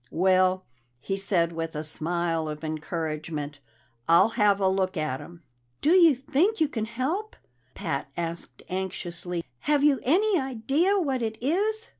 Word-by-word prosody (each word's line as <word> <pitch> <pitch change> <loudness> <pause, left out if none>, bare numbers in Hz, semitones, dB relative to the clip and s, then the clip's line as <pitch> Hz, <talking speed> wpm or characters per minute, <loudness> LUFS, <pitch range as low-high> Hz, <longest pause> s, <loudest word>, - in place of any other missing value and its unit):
"Well," 185 +1 +2 0.3
he 195 - -3
said 185 -4 +1
with 165 -1 -4
a 150 - -3
smile 165 +1 -1
of 150 +1 -7
encouragement, 155 -2 -4 0.5
"I'll 170 +6 +6
have 210 -3 +3
a 195 - +2
look 190 0 0
at 155 -4 -1
him." 170 -1 -12 0.4
"Do 305 - +2
you 340 -5 +7
think 310 - +1
you 315 - +3
can 225 -6 -3
help?" 285 - -3 0.4
Pat 140 0 -3
asked 170 0 -5
anxiously. 180 -2 -4 0.2
"Have 290 -1 +3
you 290 -3 +4
any 380 - +3
idea 270 - +1
what 275 -9 0
it 220 -1 -2
is?" 415 - +1
190 Hz, 150 wpm, -26 LUFS, 165-280 Hz, 0.5 s, you